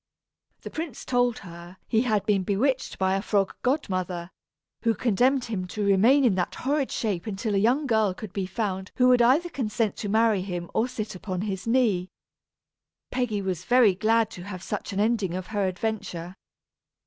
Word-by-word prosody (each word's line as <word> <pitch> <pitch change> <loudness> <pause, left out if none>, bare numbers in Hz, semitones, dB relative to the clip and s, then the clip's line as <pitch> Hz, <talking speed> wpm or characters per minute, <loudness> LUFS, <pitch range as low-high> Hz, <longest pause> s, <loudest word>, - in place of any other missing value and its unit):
The - - -8
prince 315 -6 -5
told 245 -2 +1
her 175 +1 -11
he 225 - +2
had 215 -5 +1
been 205 -2 +2
bewitched 245 +8 0
by 190 0 +1
a 195 - 0
frog 200 -2 0
godmother, 185 - -1 0.5
who 230 -1 +2
condemned 250 +5 +2
him 195 -6 -3
to 210 +3 -3
remain 230 +8 +5
in 230 - +4
that 180 -1 -1
horrid 280 +1 -1
shape 200 -5 -2
until 210 +1 -2
a 195 - +3
young 250 +8 +2
girl 220 -6 +2
could 215 -5 -8
be 195 -2 -2
found 190 -2 -3
who 250 -1 +4
would 250 -1 +5
either 280 +9 +4
consent 225 - -1
to 205 - -4
marry 220 -2 +3
him 175 -2 -5
or 225 - +2
sit 230 -4 -5
upon 185 -1 -4
his 195 0 -4
knee. 220 -7 +2 1.0
Peggy 235 -6 -1
was 185 -2 -2
very 245 -5 +5
glad 225 +3 +2
to 175 - -9
have 185 -1 -7
such 210 - -4
an 195 - -3
ending 210 -5 +1
of 185 0 -4
her 200 -2 +1
adventure. 185 -3 -4
210 Hz, 185 wpm, -26 LUFS, 190-240 Hz, 1.0 s, remain